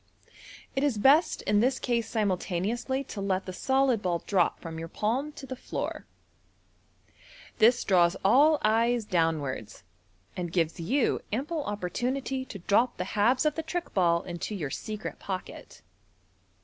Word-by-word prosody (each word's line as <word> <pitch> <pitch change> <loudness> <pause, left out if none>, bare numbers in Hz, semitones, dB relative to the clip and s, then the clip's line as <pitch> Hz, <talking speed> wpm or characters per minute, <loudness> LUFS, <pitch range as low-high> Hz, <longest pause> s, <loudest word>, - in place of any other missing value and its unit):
It 270 - +1
is 280 -7 +1
best 280 +10 +4
in 205 0 +2
this 255 +4 +2
case 235 -3 -1
simultaneously 215 +5 -1
to 210 -6 -7
let 190 -1 -1
the 185 - -6
solid 265 +1 +2
ball 175 -3 -1
drop 185 -4 +1
from 165 -1 -7
your 165 - -5
palm 245 - -1
to 285 - -9
the 260 0 -6
floor. - - -5 1.5
This 235 +2 +5
draws 175 -1 +3
all 290 +9 +6
eyes 230 +1 +2
downwards, 160 - -1 0.5
and 175 -2 -4
gives 165 -2 0
you 250 - +1
ample 290 +7 -2
oppor 205 -4 -4
tunity 260 +1 -2
to - - -7
drop 205 +7 +1
the - - -1
halves 240 +7 +3
of 305 - +3
the 320 - -3
trick 340 +2 -4
ball 170 -2 +2
into 175 +4 -5
your 150 -8 -4
secret 215 +5 -5
pocket. 190 -2 -7
215 Hz, 150 wpm, -28 LUFS, 180-260 Hz, 1.5 s, all